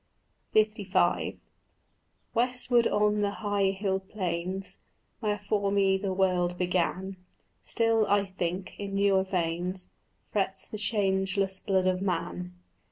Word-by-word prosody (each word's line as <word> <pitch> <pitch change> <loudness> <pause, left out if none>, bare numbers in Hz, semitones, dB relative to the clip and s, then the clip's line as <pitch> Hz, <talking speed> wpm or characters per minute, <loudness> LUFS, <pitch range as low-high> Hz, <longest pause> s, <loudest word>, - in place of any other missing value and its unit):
LV 205 -4 +2 1.0
Westward 245 0 +2
on 210 0 +2
the 205 - +2 0.2
high 205 -1 +2
hilled 190 0 -2
plains 185 0 -3 0.4
Where 210 -2 0
for 205 0 0
me 195 -1 +3
the 190 0 -2
world 180 -2 +1
began, 185 +1 -1 0.4
Still, 225 -2 +2
I 200 0 +3
think, 185 -1 -3
in 200 -1 -4
newer 195 -1 +4
veins 180 0 -2 0.4
Frets 195 -2 +1
the 215 - -6
changeless 195 -2 +1
blood 190 -2 +1
of 185 0 +1
man. 180 -1 -2
195 Hz, 115 wpm, -28 LUFS, 185-205 Hz, 1.0 s, newer